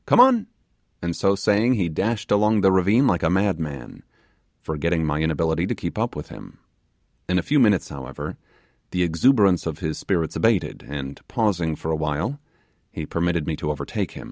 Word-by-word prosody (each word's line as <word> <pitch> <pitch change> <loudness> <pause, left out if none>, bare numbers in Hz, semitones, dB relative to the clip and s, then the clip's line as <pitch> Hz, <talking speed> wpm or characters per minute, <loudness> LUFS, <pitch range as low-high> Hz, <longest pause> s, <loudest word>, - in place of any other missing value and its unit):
Come - - +4
on;' 245 -3 +6 0.6
and 85 -1 -2
so 100 0 +2
saying, 105 +5 +2
he 95 -6 0
dashed 105 +7 -2
along 105 +1 +3
the 95 - +5
ravine 100 +8 +4
like 90 -9 +2
a 80 - +2
madman, 80 -9 -2 0.6
forgetting 80 +2 -1
my 75 -1 -1
inability 80 0 0
to - - -1
keep - - -5
up - - -1
with - - -7
him. - - -12 0.7
In 90 - +2
a 90 - +1
few 150 0 +2
minutes, 105 -8 +3
however, 70 -1 -7 0.5
the 90 0 0
exuberance 95 +1 +3
of 80 -2 -4
his 80 -4 -3
spirits 85 -5 -1
abated, 110 -4 +1
and, 70 -1 -6
pausing 90 -8 0
for 80 - -4
a - - +1
while, 75 - -2 0.5
he 80 - -5
permitte 80 -3 -2
85 Hz, 165 wpm, -23 LUFS, 80-105 Hz, 0.7 s, on